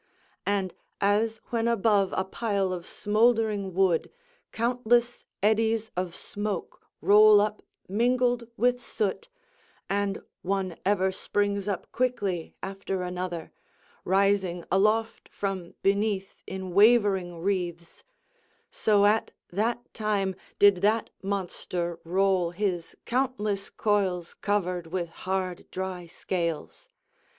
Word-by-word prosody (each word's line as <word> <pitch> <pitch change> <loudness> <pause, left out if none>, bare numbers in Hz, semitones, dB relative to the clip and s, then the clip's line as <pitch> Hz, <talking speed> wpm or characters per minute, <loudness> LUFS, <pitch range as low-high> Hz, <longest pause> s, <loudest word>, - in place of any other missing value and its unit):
And 195 -3 0 0.3
as 215 +3 +2
when 230 -1 +1
above 210 -4 +3
a - - +1
pile 200 -2 -1
of 175 -2 -6
smouldering 215 -3 +1
wood 185 -4 +2 0.4
countless 240 0 +1 0.2
eddies 220 +1 +2
of 180 -1 -2
smoke 205 -3 -4 0.2
roll 210 0 +7
up 210 +1 0 0.3
mingled 245 +3 +1
with 245 0 +2
soot, 220 - -2 0.6
and 200 0 -1 0.2
one 190 -2 -1
ever 190 -2 +3
springs 200 +1 -1
up 195 -4 -3
quickly 205 -9 -1
after 195 -1 -3
another, 180 -2 -4 0.5
rising 190 -2 +2
aloft 215 +4 +1
from 190 -3 -4
beneath 200 -1 +1
in 190 -1 -5
wavering 200 -4 +4
wreaths; 175 -2 -3 0.7
so 205 -2 +3
at 215 +2 +3 0.2
that 230 +6 -1
time 205 -3 0 0.2
did 200 -2 +6
that 210 +4 +1
monster 180 -3 -3
roll 185 0 +2
his 175 -2 -3
countless 235 -6 -1
coils 190 -5 0
covered 180 -4 -1
with 175 0 -3
hard 185 +1 -3
dry 185 -2 -5
scales. 170 - -4
200 Hz, 105 wpm, -27 LUFS, 185-215 Hz, 0.7 s, roll